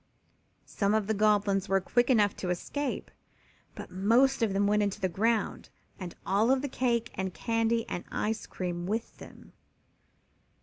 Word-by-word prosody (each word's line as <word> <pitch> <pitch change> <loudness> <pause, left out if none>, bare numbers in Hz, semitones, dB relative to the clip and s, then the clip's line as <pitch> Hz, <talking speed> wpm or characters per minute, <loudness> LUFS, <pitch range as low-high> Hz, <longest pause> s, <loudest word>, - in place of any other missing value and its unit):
Some 200 +1 0
of 215 -2 +1
the 220 - 0
Goblins 205 -2 +2
were 195 0 +3
quick 240 +6 +1
enough 210 -5 +4
to 180 - -4
escape, 265 +10 -3 0.6
but - - -9
most 235 +9 +3
of 225 -3 +2
them 200 +1 +1
went 210 +1 +3
into 205 0 -1
the 190 - +1
ground, 220 +5 -1 0.3
and 180 -3 -7
all 200 +4 +2
the 270 +2 -2
cake 240 -3 0
and 190 -1 -4
candy 230 0 0
and 175 - -4
ice 220 +1 -2
cream 175 -1 -4
with 225 +3 -3
them. - - -13
210 Hz, 160 wpm, -29 LUFS, 195-230 Hz, 0.6 s, enough